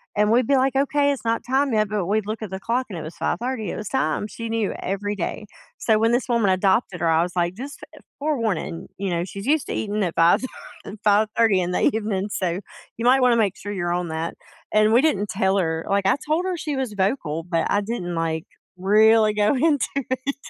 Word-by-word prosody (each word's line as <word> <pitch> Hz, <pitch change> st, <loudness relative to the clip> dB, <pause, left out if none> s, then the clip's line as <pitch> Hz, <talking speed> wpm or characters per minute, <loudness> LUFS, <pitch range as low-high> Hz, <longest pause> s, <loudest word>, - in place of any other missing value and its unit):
and 210 Hz, 0 st, +3 dB
we'd 240 Hz, 0 st, +3 dB
be 280 Hz, -, +4 dB
like, 265 Hz, 0 st, +2 dB
"Okay, 285 Hz, +1 st, +2 dB
it's 255 Hz, -5 st, -5 dB
not 230 Hz, 0 st, +1 dB
time 265 Hz, 0 st, +1 dB
yet," 215 Hz, -1 st, +2 dB
but 205 Hz, -3 st, -1 dB
we'd 210 Hz, +3 st, 0 dB
look 215 Hz, +2 st, -4 dB
at 215 Hz, -4 st, -6 dB
the 190 Hz, -, -4 dB
clock 245 Hz, +5 st, -1 dB
and 185 Hz, -, -6 dB
it -, -, -5 dB
was 155 Hz, -, -8 dB
5:30, 235 Hz, +2 st, -2 dB
it -, -, -4 dB
was 210 Hz, -1 st, -5 dB
time, 260 Hz, -5 st, 0 dB
she 230 Hz, +2 st, -7 dB
knew 225 Hz, -3 st, -1 dB
every 205 Hz, +2 st, -2 dB
day. 195 Hz, +4 st, -4 dB, 0.3 s
So, 220 Hz, -2 st, +2 dB
when 225 Hz, +1 st, +3 dB
this 245 Hz, -, +1 dB
woman 230 Hz, -5 st, +2 dB
adopted 190 Hz, 0 st, +1 dB
her, 170 Hz, -, +2 dB
I 160 Hz, 0 st, +4 dB
was 175 Hz, +1 st, -3 dB
like, 175 Hz, 0 st, +1 dB
"Just, 275 Hz, +6 st, -8 dB
uh, -, -, -14 dB, 0.2 s
forewarning," 225 Hz, -, -2 dB
you 195 Hz, 0 st, -2 dB
know, 170 Hz, -1 st, -1 dB
"she's 195 Hz, +2 st, -8 dB
used 295 Hz, +1 st, +1 dB
to -, -, -3 dB
eating 210 Hz, 0 st, -1 dB
at 175 Hz, -3 st, -2 dB
5 165 Hz, +1 st, +4 dB
thir 260 Hz, -, -3 dB, 0.4 s
uh, -, -, -7 dB
5:30 215 Hz, 0 st, +3 dB
in 175 Hz, -, -2 dB
the -, -, 0 dB
evening, 210 Hz, -2 st, 0 dB
so, 180 Hz, -2 st, -1 dB, 0.4 s
you 230 Hz, -, -4 dB
might 260 Hz, +2 st, +5 dB
wanna 250 Hz, -2 st, +5 dB
make 200 Hz, -4 st, +1 dB
sure 205 Hz, -, -6 dB
you're 175 Hz, -3 st, -1 dB
on 175 Hz, 0 st, -1 dB
that," 160 Hz, +1 st, -3 dB, 0.4 s
and 215 Hz, +1 st, +4 dB
we 240 Hz, -, +6 dB
didn't 210 Hz, -10 st, +1 dB
tell 190 Hz, 0 st, +1 dB
her 160 Hz, -3 st, -1 dB
like, 200 Hz, 0 st, +1 dB
I 195 Hz, -, +4 dB
told 320 Hz, +4 st, +1 dB
her 370 Hz, -2 st, -2 dB
she 305 Hz, -3 st, -3 dB
was 260 Hz, -5 st, -2 dB
vocal, 190 Hz, -, -1 dB
but 165 Hz, -1 st, -1 dB
I 205 Hz, -, +2 dB
didn't, 200 Hz, -5 st, -4 dB
like, 160 Hz, -1 st, -2 dB, 0.3 s
really 215 Hz, +3 st, +4 dB
go 210 Hz, +5 st, +2 dB
into 290 Hz, 0 st, +2 dB
it. 265 Hz, 0 st, -2 dB
210 Hz, 235 wpm, -23 LUFS, 185-245 Hz, 0.4 s, we